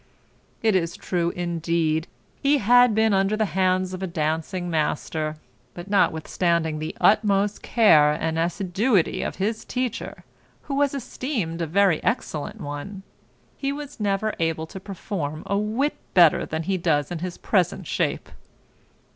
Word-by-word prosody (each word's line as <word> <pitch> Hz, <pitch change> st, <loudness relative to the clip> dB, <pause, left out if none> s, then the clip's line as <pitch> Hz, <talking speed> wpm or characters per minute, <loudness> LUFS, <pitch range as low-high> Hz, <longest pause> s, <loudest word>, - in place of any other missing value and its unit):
It 220 Hz, -3 st, +3 dB
is 170 Hz, -2 st, 0 dB
true, 170 Hz, -2 st, -1 dB
indeed, 165 Hz, -2 st, -1 dB, 0.3 s
he 285 Hz, +1 st, +4 dB
had 245 Hz, 0 st, +5 dB
been 220 Hz, -1 st, +3 dB
under 195 Hz, +2 st, +2 dB
the 215 Hz, -, +2 dB
hands 185 Hz, 0 st, +1 dB
of 185 Hz, -, -6 dB
a 190 Hz, -, -2 dB
dancing 165 Hz, +2 st, -2 dB
master; 155 Hz, -1 st, -1 dB, 0.4 s
but 175 Hz, +3 st, -8 dB
notwithstanding 170 Hz, -3 st, +1 dB
the 155 Hz, +1 st, -5 dB
utmost 205 Hz, -1 st, +3 dB
care 155 Hz, -11 st, +5 dB
and 160 Hz, +1 st, -2 dB
assiduity 190 Hz, +4 st, +1 dB
of -, -, -3 dB
his 215 Hz, +3 st, -2 dB
teacher, 250 Hz, -1 st, -4 dB, 0.4 s
who 280 Hz, -, -5 dB
was 280 Hz, 0 st, +1 dB
esteemed 240 Hz, -, -3 dB
a 165 Hz, -, -1 dB
very 185 Hz, 0 st, +2 dB
excellent 160 Hz, -, -2 dB
one; 145 Hz, +8 st, -6 dB, 0.5 s
he 275 Hz, 0 st, -1 dB
was 290 Hz, -2 st, -7 dB
never 205 Hz, +1 st, 0 dB
able 165 Hz, -1 st, -1 dB
to 190 Hz, -, -9 dB
perform 175 Hz, -6 st, -5 dB
a 200 Hz, -, -1 dB
whit 220 Hz, +8 st, 0 dB, 0.2 s
better 170 Hz, -4 st, +5 dB
than 160 Hz, +1 st, -3 dB
he 190 Hz, +3 st, 0 dB
does 160 Hz, -3 st, 0 dB
in 175 Hz, -, -3 dB
his 180 Hz, +1 st, -5 dB
present 185 Hz, -5 st, 0 dB
shape. -, -, -2 dB
185 Hz, 145 wpm, -24 LUFS, 165-215 Hz, 0.5 s, had